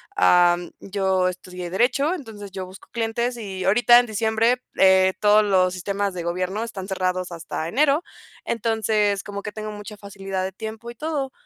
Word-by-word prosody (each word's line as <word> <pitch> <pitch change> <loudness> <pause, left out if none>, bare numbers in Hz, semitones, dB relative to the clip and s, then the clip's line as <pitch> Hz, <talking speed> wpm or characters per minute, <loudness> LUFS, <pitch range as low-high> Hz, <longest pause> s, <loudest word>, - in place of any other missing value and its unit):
Am, 175 - +4
yo 190 -2 0
estudié 180 -1 -6
derecho 265 - +2
entonces 215 - -8
yo 190 -1 -5
busco 185 +1 -14
clientes 235 +1 -1
y 190 -4 -5
ahorita 240 +4 +6
en 245 - +1
diciembre, 225 +3 +1 0.2
eh, 190 0 +5
todos 210 0 +5
los 185 -2 +2
sistemas 200 +1 -2
de 175 - -4
gobierno 185 +5 -2
están 195 -5 -6
cerrados 185 -1 -2
hasta 165 -1 -5
enero, 285 - +2 0.4
entonces 215 -3 0
como 200 0 -6
que 210 - -5
tengo 215 0 -6
mucha 210 0 -9
facilidad 195 -2 -5
de 190 - -3
tiempo 220 +3 -7
y - - -14
todo. 285 -2 -3
205 Hz, 170 wpm, -23 LUFS, 185-225 Hz, 0.4 s, ahorita